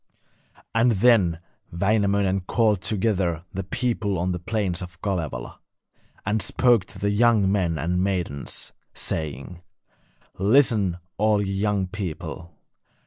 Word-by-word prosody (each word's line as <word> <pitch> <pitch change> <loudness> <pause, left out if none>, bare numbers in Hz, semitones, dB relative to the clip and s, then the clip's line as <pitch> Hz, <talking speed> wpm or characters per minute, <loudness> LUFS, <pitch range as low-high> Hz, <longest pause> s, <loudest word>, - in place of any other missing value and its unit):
And 115 +1 +4
then 100 -6 +4 0.3
Wainamoinen 100 +1 +1
called 110 -5 +2
together 95 -4 0
the 95 - -3
people 110 -1 -1
on 90 +2 0
the 90 - -3
plains 95 -2 -1
of 90 -3 -9
Kalevala, 80 -11 -3 0.7
and 105 +2 +1
spoke 115 0 +3
to - - -9
the 100 0 0
young 105 -2 +4
men 90 -5 +1
and 90 +3 0
maidens, 90 -8 -2 0.2
saying: 80 +2 -4 0.8
'Listen, 105 -4 +3 0.2
all 105 0 +3
ye 100 -1 -1
young 100 0 0
people. 90 -3 -6
95 Hz, 120 wpm, -24 LUFS, 90-105 Hz, 0.8 s, And